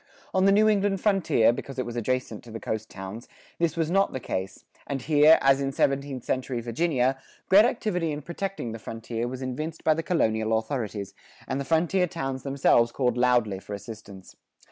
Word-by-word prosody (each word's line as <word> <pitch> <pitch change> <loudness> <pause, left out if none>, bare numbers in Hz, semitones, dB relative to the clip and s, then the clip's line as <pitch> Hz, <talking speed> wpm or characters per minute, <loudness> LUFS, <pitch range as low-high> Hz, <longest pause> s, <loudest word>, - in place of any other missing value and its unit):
On 190 0 +3
the 195 - +6
New 210 +2 +5
England 200 -2 +2
frontier, 180 - +3
because 135 +2 -7
it 130 - -1
was 120 - -6
adjacent 120 -1 -2
to 120 - -13
the 115 0 -6
coast 110 0 -4
towns, 95 +5 -8 0.3
this 170 -1 0
was 165 0 0
not 195 +1 +2
the 130 - -3
case, 95 -5 -5 0.2
and 140 - -2
here, 150 +3 +6
as 135 0 +4
in 135 0 -1
seventeenth 135 -1 -1
century 130 -1 -2
Virginia, 130 +2 0 0.3
great 200 +3 +7
activity 185 -9 -1
in 150 0 -5
protecting 175 -6 -4
the 115 - -7
frontier 115 +1 -4
was 130 +1 -6
evinced 155 +5 -5
by 155 - +4
the 160 - -2
colonial 110 -10 +1
authorities, 110 -4 -4 0.3
and 135 - -2
the - - -5
frontier 170 +4 +2
towns 135 -6 -4
themselves 130 -3 +3
called 125 -2 0
loudly 120 -5 +2
for 100 +1 -7
assistance. 100 -3 -11
130 Hz, 190 wpm, -26 LUFS, 115-165 Hz, 0.3 s, great